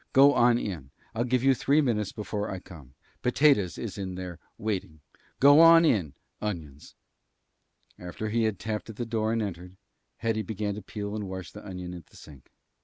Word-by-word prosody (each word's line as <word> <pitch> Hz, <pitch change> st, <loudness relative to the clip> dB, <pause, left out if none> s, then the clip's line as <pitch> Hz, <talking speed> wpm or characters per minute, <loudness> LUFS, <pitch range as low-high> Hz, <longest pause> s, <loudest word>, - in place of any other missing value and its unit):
Go 140 Hz, +2 st, +7 dB
on 120 Hz, -2 st, +4 dB
in. 85 Hz, -, -5 dB, 0.2 s
I'll 120 Hz, +2 st, -1 dB
give 125 Hz, 0 st, +1 dB
you 135 Hz, 0 st, +5 dB
three 140 Hz, +3 st, +2 dB
minutes 110 Hz, -8 st, 0 dB
before 105 Hz, -1 st, -4 dB
I 95 Hz, -, -4 dB
come. 75 Hz, -8 st, -13 dB, 0.3 s
Potatoes 125 Hz, -, +3 dB
is 105 Hz, -3 st, -6 dB
in 95 Hz, -2 st, -4 dB
there, 90 Hz, -2 st, -7 dB, 0.2 s
waiting. 100 Hz, -8 st, -4 dB, 0.4 s
Go 145 Hz, +2 st, +7 dB
on 165 Hz, 0 st, +8 dB
in, 90 Hz, -, +1 dB, 0.3 s
Onions." 80 Hz, -9 st, -6 dB, 1.0 s
After 90 Hz, +5 st, -5 dB
he 115 Hz, +1 st, +1 dB
had 110 Hz, -3 st, -1 dB
tapped 110 Hz, +3 st, -4 dB
at 110 Hz, -, -8 dB
the 120 Hz, -, -4 dB
door 110 Hz, -1 st, -1 dB
and 115 Hz, -1 st, 0 dB
entered, 90 Hz, -2 st, -7 dB, 0.4 s
Hetty 115 Hz, -1 st, -1 dB
began 105 Hz, 0 st, -3 dB
to 105 Hz, -, -7 dB
peel 100 Hz, +1 st, -6 dB
and 105 Hz, -3 st, -4 dB
wash 95 Hz, -1 st, -7 dB
the 105 Hz, -, -11 dB
onion 90 Hz, -3 st, -7 dB
at 85 Hz, -4 st, -10 dB
the -, -, -18 dB
sink. 70 Hz, -4 st, -15 dB
105 Hz, 185 wpm, -27 LUFS, 90-115 Hz, 1.0 s, on